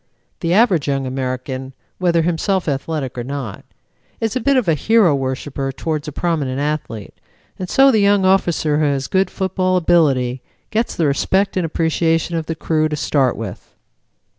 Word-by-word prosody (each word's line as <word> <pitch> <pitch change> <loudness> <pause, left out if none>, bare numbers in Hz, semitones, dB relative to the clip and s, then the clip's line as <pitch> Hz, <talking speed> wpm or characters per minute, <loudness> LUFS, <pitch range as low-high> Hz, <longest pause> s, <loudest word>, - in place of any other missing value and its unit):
The 170 -2 -1
average 190 - +3
young 135 -1 0
American, 130 0 -4 0.3
whether 170 -2 +2
himself 175 +3 0
athletic 140 -2 -3
or - - -3
not, 130 -6 -6 0.6
is 225 0 -2
a - - +1
bit 275 +2 +2
of 245 -7 +1
a 165 - +4
hero 205 +1 +3
worshipper 135 0 -3
towards 155 +2 -3
a - - -4
prominent 145 -5 -1
athlete, 145 -8 -3 0.5
and 185 -1 -5
so 270 0 +5
the 220 - +3
young 200 -1 +3
officer 170 -5 +2
who 155 - +2
has 140 -2 0
good 190 -1 +1
football 185 -1 0
ability 135 -8 +2 0.3
gets 225 +2 -1
the 165 - +1
respect 190 +7 +1
and 180 -3 0
appreciation 165 +1 0
of 160 -2 -3
the 165 - -2
crew 155 -1 0
to 150 - -2
start 140 -3 +1
with." 110 -5 -8
160 Hz, 170 wpm, -19 LUFS, 135-185 Hz, 0.6 s, so